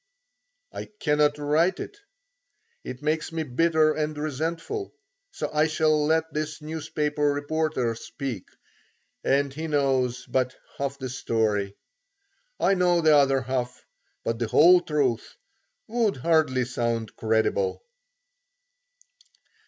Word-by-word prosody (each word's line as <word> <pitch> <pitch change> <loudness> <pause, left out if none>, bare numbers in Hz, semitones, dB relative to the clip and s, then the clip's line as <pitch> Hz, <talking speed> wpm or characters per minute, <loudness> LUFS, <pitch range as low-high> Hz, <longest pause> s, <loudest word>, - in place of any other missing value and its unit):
I - - -6
cannot 150 -1 +2
write 155 +5 +2
it; 410 - -7 0.8
it 130 +2 -8
makes 155 +2 -1
me 165 -1 -2
bitter 155 +3 +2
and 155 0 -2
resentful; 165 - -3 0.3
so - - -5
I 155 +1 +3
shall 155 -1 +2
let 160 +1 +1
this 155 0 -3
newspaper 150 -1 -3
reporter 145 -4 -1
speak, 120 -2 -6 0.8
and 140 0 +1
he 160 +3 -4
knows 130 -4 +1
but 130 -1 0 0.2
half 140 0 -2
the 130 -1 -5
story. 110 -5 -1 0.8
I 195 - +3
know 180 -2 +3
the 155 -2 +5
other 135 -2 +4
half, 125 0 -3 0.4
but 115 0 -2
the 115 - -1
whole 175 +9 +6
truth 145 -8 -1 0.5
would 225 - 0
hardly 130 -3 +2
sound 115 -2 -2
credible. 110 - 0
150 Hz, 115 wpm, -26 LUFS, 130-160 Hz, 0.8 s, whole